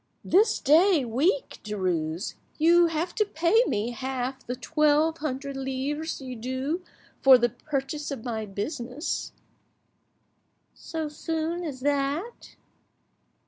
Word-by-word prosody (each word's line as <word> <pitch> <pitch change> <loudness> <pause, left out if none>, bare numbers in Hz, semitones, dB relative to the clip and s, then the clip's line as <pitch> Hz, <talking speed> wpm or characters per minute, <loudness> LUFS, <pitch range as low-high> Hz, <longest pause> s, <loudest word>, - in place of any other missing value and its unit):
"This 415 +4 +4
day 315 +1 +4
week, 320 - 0
Derues, 180 -4 -2 0.2
you 340 +2 +5
have 330 +2 -2
to 430 - +2
pay 390 +4 +3
me 215 +4 -1
half 260 +2 -4
the 250 - -2
twelve 305 +4 +2
hundred 280 -1 -3
livres 270 +4 -3
due 260 +6 -3 0.4
for 265 -1 +9
the 240 0 +2
purchase 295 +3 -4
of 270 -5 -6
my 220 -3 -3
business." 245 - -4 1.4
"So 320 -1 -5
soon 325 +3 -3
as 280 -6 -5
that?" 290 - -2
280 Hz, 110 wpm, -27 LUFS, 250-320 Hz, 1.4 s, for